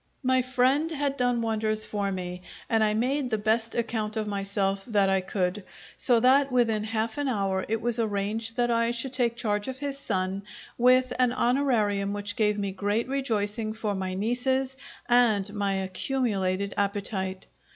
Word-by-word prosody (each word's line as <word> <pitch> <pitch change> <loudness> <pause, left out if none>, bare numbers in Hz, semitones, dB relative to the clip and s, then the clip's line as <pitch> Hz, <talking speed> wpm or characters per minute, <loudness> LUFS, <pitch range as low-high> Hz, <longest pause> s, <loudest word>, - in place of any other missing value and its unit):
My 260 0 +3
friend 255 +5 +2
had 285 -3 -1
done 245 -2 +1
wonders 215 -1 -1
for 200 -2 -2
me; 180 -1 -5 0.3
and 225 -1 +2
I 210 0 +2
made 255 +4 0
the 220 - 0
best 220 +2 0
account 220 -2 -1
of 215 - 0
myself 195 -1 -1
that 205 -5 +2
I 190 0 +3
could, 185 +1 -2 0.3
so 240 -3 +3
that 270 +2 +5
within 230 -4 +2
half 220 +3 -2
an 290 - 0
hour 195 -6 -1
it 225 0 0
was 240 0 -1
arranged 220 +2 -1
that 240 -1 +2
I 230 0 +2
should 240 +2 -3
take 240 -3 +1
charge 210 -3 -1
of 260 0 -4
his 280 0 -4
son, 190 -5 -2 0.3
with 255 +1 +4
an 250 -1 +4
honourarium 230 -6 +1
which 205 0 -4
gave 210 -3 +2
me 200 -1 -2
great 205 +5 -1
rejoicing 220 -5 -1
for 220 -2 -2
my 190 -1 -3
nieces 255 +5 0 0.3
and 220 -5 +3
my 200 -2 0
accumulated 195 -1 -1
appetite. 195 -2 -2
220 Hz, 170 wpm, -27 LUFS, 200-245 Hz, 0.3 s, that